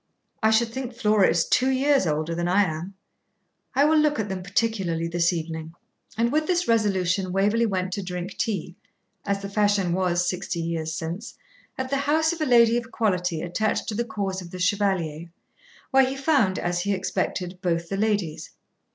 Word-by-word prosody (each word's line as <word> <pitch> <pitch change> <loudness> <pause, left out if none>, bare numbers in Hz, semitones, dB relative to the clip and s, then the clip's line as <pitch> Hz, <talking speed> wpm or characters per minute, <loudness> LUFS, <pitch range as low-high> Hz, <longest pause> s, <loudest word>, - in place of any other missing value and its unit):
I 220 - +4
should 225 +1 +3
think 250 0 -6
Flora 210 -4 +3
is 165 0 +2
two 260 +1 +3
years 270 -5 +2
older 155 +2 -1
than 175 +1 -1
I 195 +3 +4
am. 175 +2 -4 0.8
I 280 +2 +5
will 310 +1 +4
look 300 -3 +2
at 210 -2 -2
them 190 -1 -4
particularly 185 -4 -1
this 170 +1 +1
evening.' 160 -1 -5 0.4
And 235 +1 +2
with 310 +1 +1
this 360 -1 +1
resolution 190 -4 +1
Waverley 205 +5 +2
went 185 -2 -2
to 200 - -2
drink 180 -1 -5
tea 185 -5 -2 0.5
(as 200 0 -1
the - - -3
fashion 200 -3 +1
was 175 -1 +1
Sixty 180 -1 -2
Years 165 -1 -2
Since) 170 +8 -5 0.4
at 260 0 -4
the 275 - +2
house 315 +4 +2
of 335 - -7
a - - +2
lady 235 -2 +5
of 235 -1 -4
quality 180 -6 0
attached 195 +5 -1
to - - -3
the 235 +3 0
cause 200 -4 -3
of 175 - -10
the 185 - -8
Chevalier, 180 -4 0 0.6
where 270 0 +6
he 265 +1 -3
found, 270 -9 +2
as 175 0 -1
he 200 +3 0
expected, 185 -1 -2
both 170 -2 -1
the 195 - -3
ladies. 200 -7 -1
195 Hz, 185 wpm, -25 LUFS, 175-230 Hz, 0.8 s, where